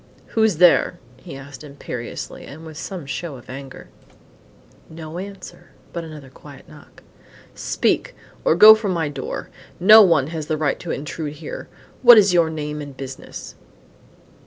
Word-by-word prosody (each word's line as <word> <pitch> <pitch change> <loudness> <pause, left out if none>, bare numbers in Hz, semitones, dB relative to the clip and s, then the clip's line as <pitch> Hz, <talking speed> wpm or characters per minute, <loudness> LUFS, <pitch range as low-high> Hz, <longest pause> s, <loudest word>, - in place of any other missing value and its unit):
"Who's 220 -4 +2
there?" 175 +1 +4 0.2
he 135 - -11
asked, 135 +2 -11
imperiously 140 -4 -7
and 155 +4 -11
with 160 -1 -10
some 180 0 -7
show 145 +2 -5
of 125 0 -12
anger. 135 0 -10 1.0
No 160 +1 -8
answer, 195 0 -10 0.2
but 170 - -4
another 150 -5 -11
quiet - - -15
knock. - - -17 0.5
"Speak! - - -1 0.3
or - - +3
go 215 +5 +10
from 215 -3 -2
my 165 -4 -1
door. 135 -2 -6 0.3
No 215 +5 +9
one 170 -9 +4
has 155 -2 -5
the 155 - -1
right 145 -2 -1
to 175 - -8
intrude 150 +1 -5
here. 150 0 -8 0.3
What 240 -2 +9
is 200 -3 +5
your 170 -2 +3
name 150 -1 -5
and 140 -2 -10
business?" 135 -1 -9
155 Hz, 155 wpm, -21 LUFS, 140-180 Hz, 1.0 s, go